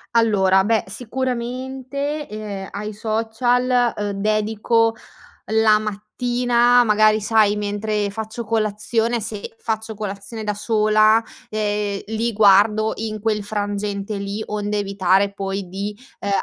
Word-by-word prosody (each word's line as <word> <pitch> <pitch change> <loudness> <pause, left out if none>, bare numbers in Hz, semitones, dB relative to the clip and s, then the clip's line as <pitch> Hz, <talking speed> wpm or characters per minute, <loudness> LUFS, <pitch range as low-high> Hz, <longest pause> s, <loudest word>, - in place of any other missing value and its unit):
Allora, 195 -4 +4
beh, 220 +1 +1
sicuramente, 260 +5 -4
ehm, 205 -2 -6
ai 210 +1 -5
social, 240 +3 +1
uhm, 205 -1 -2
dedico 215 +2 +1 0.6
la 220 -1 +4
mattina 240 +3 +2
magari 215 0 +4
sai 210 -1 +3
mentre 205 0 -1
faccio 220 +2 -5
colazione, 225 +2 0
se 215 0 -6
faccio 220 -1 -3
colazione 205 +2 -6
da 210 0 -1
sola, 215 +1 +3 0.3
ehm, 210 -2 -1
li 225 +1 -1
guardo 210 +1 +5
in 215 -1 -4
quel 215 -1 0
frangente 205 0 -3
lì, 200 +2 -4
onde 210 0 -2
evitare 195 0 +2
poi 195 -1 -4
di, 200 +2 -4 0.2
ehm, 200 - -4
215 Hz, 115 wpm, -21 LUFS, 205-225 Hz, 0.6 s, guardo